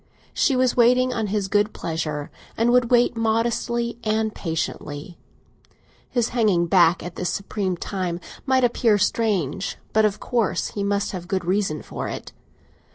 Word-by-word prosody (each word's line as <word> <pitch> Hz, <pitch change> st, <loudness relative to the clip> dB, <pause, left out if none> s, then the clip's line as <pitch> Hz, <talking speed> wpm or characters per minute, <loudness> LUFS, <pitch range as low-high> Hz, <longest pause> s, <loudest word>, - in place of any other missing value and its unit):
She 275 Hz, -, +2 dB
was 255 Hz, -1 st, +2 dB
waiting 250 Hz, +1 st, +4 dB
on 225 Hz, -3 st, -1 dB
his 205 Hz, -1 st, -1 dB
good 210 Hz, +2 st, +1 dB
pleasure, 155 Hz, -3 st, -3 dB, 0.3 s
and 230 Hz, +2 st, +3 dB
would 245 Hz, -1 st, +3 dB
wait 245 Hz, -1 st, +4 dB
modestly 235 Hz, +1 st, 0 dB
and 220 Hz, 0 st, 0 dB
patiently; 160 Hz, -1 st, -4 dB, 0.9 s
his 240 Hz, -2 st, 0 dB
hanging 210 Hz, -8 st, +2 dB
back 170 Hz, 0 st, +4 dB
at 175 Hz, -1 st, -8 dB
this 180 Hz, -, -1 dB
supreme 195 Hz, -2 st, -2 dB
time 180 Hz, -2 st, -3 dB, 0.2 s
might 260 Hz, -1 st, +2 dB
appear 230 Hz, -3 st, +3 dB
strange, 195 Hz, -, 0 dB, 0.2 s
but 220 Hz, -, +4 dB
of 210 Hz, -1 st, +1 dB
course 215 Hz, -7 st, 0 dB
he 200 Hz, -, -4 dB
must 200 Hz, 0 st, 0 dB
have 180 Hz, -3 st, -6 dB
a -, -, -17 dB
good 185 Hz, -2 st, -1 dB
reason 185 Hz, -4 st, 0 dB
for -, -, -5 dB
it. -, -, -6 dB
210 Hz, 160 wpm, -23 LUFS, 180-235 Hz, 0.9 s, waiting